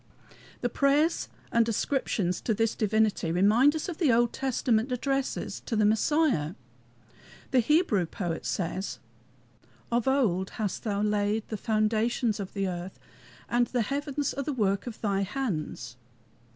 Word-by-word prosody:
The - - +1
prayers 290 +4 +2 0.2
and 230 0 +3
ascriptions 210 -6 0
to 220 - +1
this 225 +1 +1
divinity 215 -5 +1
remind 215 - +4
us 315 - -3
of 350 -4 -6
the 310 -8 +4
Old 235 0 +3
Testament 250 -2 0
addresses 270 +2 -2
to 235 - -1
the 215 -1 +3
Messiah. 220 - +2 1.0
The 260 - +4
Hebrew 240 - +2
poet 170 -1 -4
says: 190 +2 -3 0.9
"Of 235 +1 +1
old 210 -9 +2
hast 210 -4 -2
thou 205 -1 0
laid 210 +1 0
the 220 - -3
foundations 220 +2 0
of 195 -2 -6
the 195 -1 -1
earth, 180 +1 -5 0.5
And 240 0 +2
the 245 -2 0
heavens 285 +3 -2
are 280 - -3
the 295 - -2
work 200 -3 0
of 230 - -6
thy 200 -2 +1
hands." 180 - -3
220 Hz, 145 wpm, -28 LUFS, 200-265 Hz, 1.0 s, remind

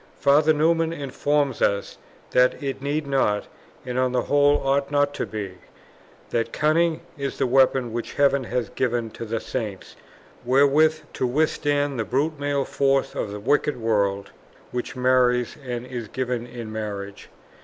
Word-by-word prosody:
Father 150 +2 +4
Newman 165 +2 +2
informs 145 -2 -1
us 100 0 0 0.3
that 125 +3 +3
it 135 -1 -3
need 145 +2 -1
not, 130 -7 +1 0.4
and 125 0 -2
on 130 -1 +1
the 125 - +1
whole 145 0 +4
ought 140 0 +1
not 145 0 +2
to - - -3
be; 100 -4 -6 0.7
that 115 -1 0
cunning 160 +2 +2 0.2
is 140 0 -3
the - - +1
weapon 130 -2 +3
which 120 0 -4
heaven 140 -2 +2
has 120 -1 -2
given 120 -3 -1
to 115 - -7
the 115 +1 -2
Saints 110 -7 -5 0.5
wherewith 145 +5 +4
to 130 - -1
withstand 145 0 0
the - - +1
brute 140 +6 -1
male 145 -1 0
force 135 -1 +1
of - - -3
the 105 +1 -6
wicked 145 +4 +1
world 100 -3 0 0.4
which 125 +1 -4
marries 125 -1 +2
and 120 -1 -4
is 120 -3 -6
given 125 0 -3
in 120 -2 -8
marriage. 100 -2 -6
130 Hz, 155 wpm, -24 LUFS, 120-145 Hz, 0.7 s, Father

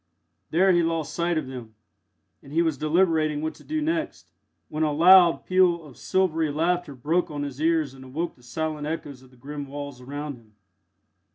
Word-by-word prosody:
There 185 +4 +4
he 175 -1 +4
lost 165 -2 -1
sight 170 -1 0
of 155 - -1
them, 125 -4 -9 0.7
and 140 - -14
he 165 +3 +2
was 160 -3 0
deliberating 155 0 +2
what 160 0 -2
to - - -17
do 310 0 -2
next, 325 0 -3 0.4
when 155 - -4
a 155 -1 +2
loud 175 +3 +6
peal 180 -3 +3
of 135 -4 -13
silvery 165 -4 0
laughter 165 0 -1
broke 160 +8 0
on 145 -1 -4
his 140 0 -6
ears 160 -4 +1
and 135 -1 -13
awoke 155 +6 -4
the 125 - -23
silent 150 +4 -4
echoes 145 -4 -5
of 130 - -18
the 125 - -22
grim 145 +2 -7
walls 140 -2 -7
around 145 +1 -6
him. 110 -3 -23
155 Hz, 190 wpm, -25 LUFS, 140-170 Hz, 0.7 s, loud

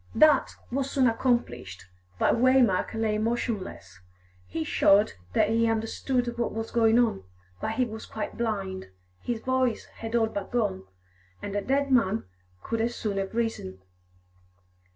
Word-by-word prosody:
That 300 +2 +5 0.2
was 270 +1 -1
soon 270 -2 +2
accomplished, 125 - -1 0.3
but - - +3
Waymark 240 -6 +3
lay 220 -1 0
motionless; 215 - -3 0.5
he 160 - -3
showed 200 +6 +4 0.2
that 215 - +3
he 230 0 +2
understood 240 +2 -1
what 235 - 0
was 225 +1 -4
going 225 -1 +4
on, 230 - +2 0.4
but 220 - -1
he 255 +2 +1
was 220 -1 -8
quite 220 - -5
blind, 195 - -3 0.3
his 235 -2 -3
voice 260 -3 0
had 225 +1 -4
all 230 -1 +4
but 200 -3 -5
gone, 95 - -1 0.5
and 200 0 -5
a 205 - +1
dead 275 +4 0
man 220 -5 +3 0.4
could 230 -1 -2
as 235 +1 -1
soon 205 -3 -2
have 195 +2 -3
risen. 225 - -2
225 Hz, 150 wpm, -27 LUFS, 200-240 Hz, 0.5 s, That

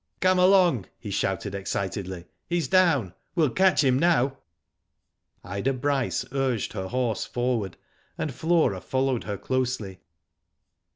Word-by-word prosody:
Come 185 0 +3
along!" 180 - +4
he 105 - -7
shouted, 95 +1 -1
excitedly, 95 -2 -4 0.2
"he's 170 -4 0
down. 145 - +3 0.2
We'll 155 -7 +2
catch 190 -1 +3
him 130 -1 +3
now." 140 -5 +2 1.0
Ida 100 +9 -2
Bryce 135 0 -1
urged 135 -4 -1
her 95 - -4
horse 120 -2 -1
forward, 120 -6 -2 0.4
and 150 - -3
Flora 160 - +1
followed 130 -2 -1
her 105 -1 -3
closely. 125 -8 -2
130 Hz, 120 wpm, -26 LUFS, 100-155 Hz, 1.0 s, along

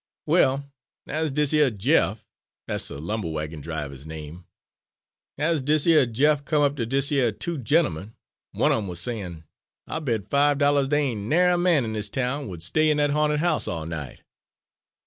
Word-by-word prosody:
"Well, 135 +2 +2 0.4
as 155 +2 -2
dis 150 +1 +1
yer 150 -3 +4
Jeff 110 -1 +1 0.4
dat's - - -2
de - - -7
lumber 90 +4 -3
wagon 75 0 -5
driver's 75 -3 -6
name 80 +2 -9 0.9
as 160 0 +1
dis 150 +2 +2
yer 155 -6 +5
Jeff 145 +5 +2
come 150 0 +1
up 140 0 +2
ter 120 -5 -2
dese 135 +4 0
yer 130 -5 +2
two 165 +9 -4
gentlemen, 110 - 0 0.4
one - - +2
of - - +2
'em 100 - -5
was 90 -2 -4
sayin, 90 -6 -5 0.4
'I'll 160 - -4
bet 115 - -2
five 145 +3 +3
dollahs 140 -1 +3
dey 145 -2 +1
ain' 105 -1 -5
narry 180 +3 +4
a - - +1
man 170 -8 +3
in 110 - -4
his 105 -1 -2
town 130 +4 -2
would 85 -4 -7
stay 155 - +2
in 150 - +2
dat 145 -1 +2
ha'nted 150 0 +1
house 170 -2 +1
all 80 -2 -3
night.' 80 -5 -7
130 Hz, 185 wpm, -24 LUFS, 95-150 Hz, 0.9 s, yer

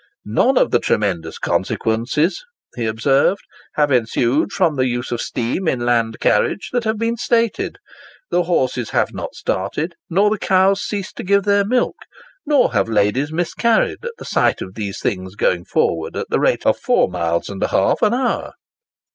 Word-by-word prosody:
"None 245 - +2
of - - +3
the 120 - +4
tremendous 90 -9 -1
consequences," 120 - 0 0.3
he 115 -2 -2
observed, 135 - +2 0.3
"have 145 -1 +2
ensued 125 - +1
from 175 -6 +1
the 130 -1 +1
use 120 0 -3
of 120 - -2
steam 125 +10 -2
in 120 -5 0
land 115 -2 +1
carriage 105 - +1
that 245 -2 0
have 220 0 0
been 230 +1 -1
stated. 230 -1 0 0.5
The 180 - +3
horses 130 -9 0
have - - 0
not - - -6
started, 150 - -2 0.2
nor 200 +5 +3
the 215 - -1
cows 195 +1 +3
ceased 200 -3 -5
to - - -5
give 200 +1 +2
their 200 0 +3
milk, 245 +5 0 0.5
nor 285 -4 +3
have - - +1
ladies 110 +7 +1
miscarried 215 - 0
at 475 0 -5
the - - -10
sight - - +1
of 95 - -7
these 100 -2 -5
things 95 0 -3
going 90 -4 0
forward 80 -1 -1
at - - -5
the - - +2
rate - - +1
of - - +2
four - - +2
miles 85 -2 -1
and 100 -1 -7
a - - +2
half 95 - +1
an 215 +2 +3
hour." 255 -1 -1
140 Hz, 180 wpm, -19 LUFS, -, 0.5 s, the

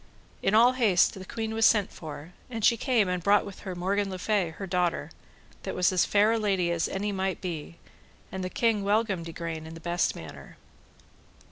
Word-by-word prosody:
In 205 - +2
all 235 +3 +7
haste, 220 -9 +3
the 190 - -8
queen 220 +2 -4
was 225 0 0
sent 210 -3 +4
for, 155 +1 -9 0.2
and 225 -3 -2
she 235 - +5
came 230 -4 +1
and 180 -1 -1
brought 200 +3 +3
with 200 -2 -9
her 190 -3 -6
Morgan 195 +3 0
le 185 - -5
Fay, 195 -2 0
her 175 +5 -7
daughter, 180 -2 -1 0.5
that - - -5
was 180 0 +3
as 185 -2 +3
fair 210 +2 +3
a 230 - +1
lady 190 -5 +1
as 170 -1 0
any 205 +2 -2
might 190 -1 -2
be, 170 -2 -6 0.5
and 190 0 -4
the 185 - -3
king 220 0 +1
welcomed 200 -5 0
Igraine 165 -1 -5
in 160 - -9
the - - -9
best 175 +1 0
manner. 80 - -11
190 Hz, 205 wpm, -27 LUFS, 175-210 Hz, 0.5 s, all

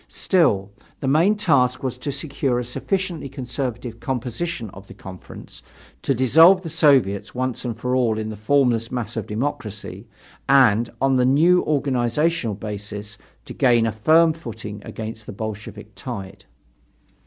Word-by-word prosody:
Still, 105 - +1 0.3
the 135 - -3
main 165 +10 +4
task 135 -11 +2
was 130 -2 -2
to 140 - -3
secure 140 -2 -2
a 125 - -1
sufficiently 170 - -3
conservative 125 -3 -5
composition 125 - -4
of 95 +1 -13
the - - -12
Conference, 95 -1 -11 0.4
to 135 - 0
dissolve 160 +10 +6
the 165 - -5
Soviets 135 - +2
once 130 0 -2
for 125 +3 -2
all 120 -4 +1
in 110 0 -3
the 110 - -6
formless 115 0 +1
mass 120 -3 -4
of 110 -4 -4
democracy, 105 -4 -5 0.4
and, 120 -4 +5
on 135 0 +2
the 125 - +3
new 165 +7 +4
organizational 135 -2 0
basis, 105 0 -7 0.3
to - - -8
gain 120 -3 +3
a 115 - 0
firm 160 +9 +4
footing 115 -8 -8
against 110 -1 -7
the - - -5
Bolshevik 110 +1 -7
tide. 95 -1 -8
125 Hz, 145 wpm, -22 LUFS, 110-140 Hz, 0.4 s, dissolve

